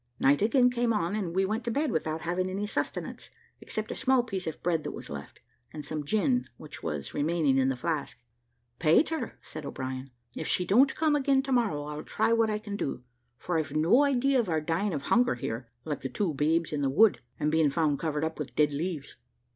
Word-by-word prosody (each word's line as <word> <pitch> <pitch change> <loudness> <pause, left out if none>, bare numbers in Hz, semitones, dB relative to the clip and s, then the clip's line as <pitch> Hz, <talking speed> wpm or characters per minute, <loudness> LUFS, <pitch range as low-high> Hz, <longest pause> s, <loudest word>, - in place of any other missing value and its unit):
Night 140 +1 +4
again 245 +4 +4
came 240 -1 +1
on, 200 -3 0
and 190 -5 -2
we 190 0 +3
went 215 +4 -2
to 235 - -2
bed 285 +4 0
without 160 -1 -2
having 180 +2 -1
any 195 +2 -2
sustenance, 210 - -3 0.3
except 215 0 -3
a - - -3
small 265 -1 +3
piece 195 -7 -4
of 160 - -5
bread 165 -3 +1
that - - -4
was - - -8
left, - - -8 0.3
and 150 -2 -7
some 150 0 -3
gin 220 - +1
which 150 - -10
was 75 -2 -4
remaining 150 -3 +2
in 130 0 +3
the 135 - 0
flask, 140 -3 -3 0.6
"Peter," 305 - +2
said 155 - -7
O'Brien, 130 -1 -5 0.3
"if 160 - -4
she 180 - +2
don't 250 +9 +4
come 310 -2 +2
again 270 -1 +2
to 270 - -4
morrow, 225 - +1
I'll 150 +1 -5
try 230 - +1
what 225 -1 +3
I 210 - 0
can 210 -1 -6
do; 135 -9 -3 0.3
for 170 +5 -1
I've 150 -2 -4
no 165 - +5
idea 275 -1 +3
of 220 -6 0
our 160 -2 +2
dying 165 +6 -1
of 145 -4 -3
hunger 245 - +3
here, 115 +1 -5 0.2
like 150 -3 -3
the 135 - -3
two 170 +5 -1
babes 155 +3 +1
in 145 - -1
the 135 - +1
wood, 195 - +5 0.2
and 150 - +1
being 160 -2 +3
found 150 -1 +1
covered 155 -2 -1
up 160 0 -3
with 150 - -5
dead 150 -1 +3
leaves. 155 -1 -4
170 Hz, 220 wpm, -29 LUFS, 150-225 Hz, 0.6 s, no